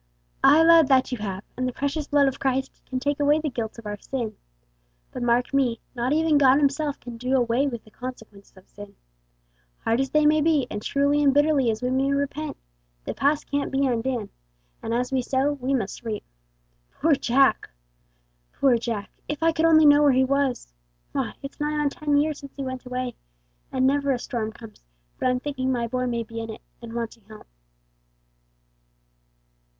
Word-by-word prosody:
"Aye, 315 +2 +7
lad, 330 -3 +7
that 265 -1 +3
you 250 - -3
have, 195 -2 -4
and 255 0 -1
the - - -2
precious 285 +3 -3
blood 285 -1 +3
of 270 - -2
Christ 265 0 -2
can 255 - -3
take 285 +2 -1
away 290 +1 +4
the 305 -2 -3
guilt 230 -2 -4
of 230 - -11
our 205 -1 -5
sin; 230 -4 -4 0.8
but, - - -6
mark 245 +2 +1
me, 250 -4 +1
not 245 +1 -1
even 310 -1 +3
God 270 -1 +6
Himself 290 0 0
can 240 -1 -9
do 250 +3 -1
away 245 +2 +2
with 235 -4 -5
the 215 - -19
consequences 220 -6 -10
of 190 - -18
sin. 205 -1 -12 0.9
Hard 230 +2 +1
as 270 - -2
they 305 0 +3
may 305 +1 +4
be, 300 -4 +2
and 210 - -4
truly 280 +4 +1
and 280 -2 +3
bitterly 290 -4 +3
as 220 +2 -2
we 250 - 0
may 270 +1 +1
repent, 285 +2 -2 0.5
the - - -3
past 290 +2 +1
can't 285 0 -2
be 275 +1 +1
undone; 240 -3 -1 0.5
and - - -4
as 245 +2 -1
we 265 -1 +1
sow 265 +3 0
we 265 -1 -4
must 230 -8 -2
reap. 220 -3 -4 0.7
Poor 315 +2 +1
Jack! 270 0 +2 0.8
Poor 255 -4 +3
Jack! 225 -4 -4 0.2
If 295 +1 -4
I 330 - +5
could 325 0 0
only 315 -1 +6
know 290 0 +7
where 290 -2 +5
he 260 +1 +4
was. 265 - -1 0.4
Why, - - -3
it's 275 - -8
nigh 300 0 -1
on 290 -1 +1
ten 295 -1 0
years 300 0 0
since 280 -2 -12
he 275 - -5
went 260 -1 -6
away, 250 -1 -3 0.6
and 260 0 +1
never 280 +1 +2
a 260 - +1
storm 230 -3 -4
comes 225 -1 -14 0.4
but - - +1
I'm 250 0 +1
thinking 260 -1 -2
my 240 -2 0
boy 255 +2 -2
may 235 -1 -1
be 230 +1 -8
in 225 - -6
it, 220 - -8 0.2
and 230 -1 -9
wanting 230 -2 -5
help." 215 0 -13
260 Hz, 195 wpm, -24 LUFS, 235-285 Hz, 0.9 s, Aye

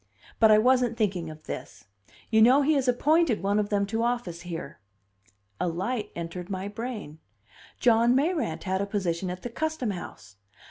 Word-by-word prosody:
But 220 - +6
I 215 - +7
wasn't 245 0 +3
thinking 185 -7 -1
of 155 0 -11
this. - - -8 0.5
You 220 -1 +5
know 260 +5 +6
he 310 +3 +3
has 275 -3 +1
appointed 280 - +2
one 200 +2 +2
of 205 -1 -1
them 200 -1 +1
to 225 +3 -2
office 235 -8 -2
here." 170 -7 -7 0.8
A - - 0
light 200 +8 -2
entered 170 +1 -6
my 190 0 -3
brain: 210 -8 -6 0.6
John 235 +1 +4
Mayrant 300 - 0
had 190 0 -1
a 200 - -2
position 185 -3 -2
at 180 +1 -6
the 245 - -4
Custom 310 -3 -2
House! 100 - -9
210 Hz, 175 wpm, -27 LUFS, 180-245 Hz, 0.8 s, I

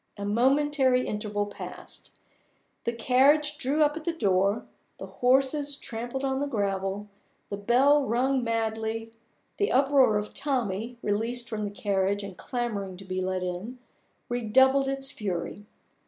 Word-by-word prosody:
A 200 - -4
momentary 260 +3 +3
interval 210 -1 -2
passed. 205 - -9 0.8
The 235 - +1
carriage 280 +6 +3
drew 290 +4 +2
up 295 0 +2
at 320 - -6
the 340 - 0
door; 200 - +1 0.3
the - - -7
horses 275 +3 +2
trampled 240 +1 -5
on 265 0 0
the 285 - -1
gravel; 200 -3 -2 0.4
the 200 - -3
bell 265 +8 +4
rung 255 +2 +1
madly; 225 0 -2 0.5
the 410 - +1
uproar 270 -4 +4
of 210 0 -4
Tommie, 240 -4 -2
released 230 +4 -1
from 215 -2 -3
the - - -2
carriage 200 0 0
and 200 -2 -7
clamoring 205 -5 -4
to 195 - -11
be 185 0 -3
let 185 0 -1
in, 180 +8 -5 0.5
redoubled 265 +4 +3
its 270 0 -2
fury. 205 +1 -4
235 Hz, 140 wpm, -27 LUFS, 205-270 Hz, 0.8 s, bell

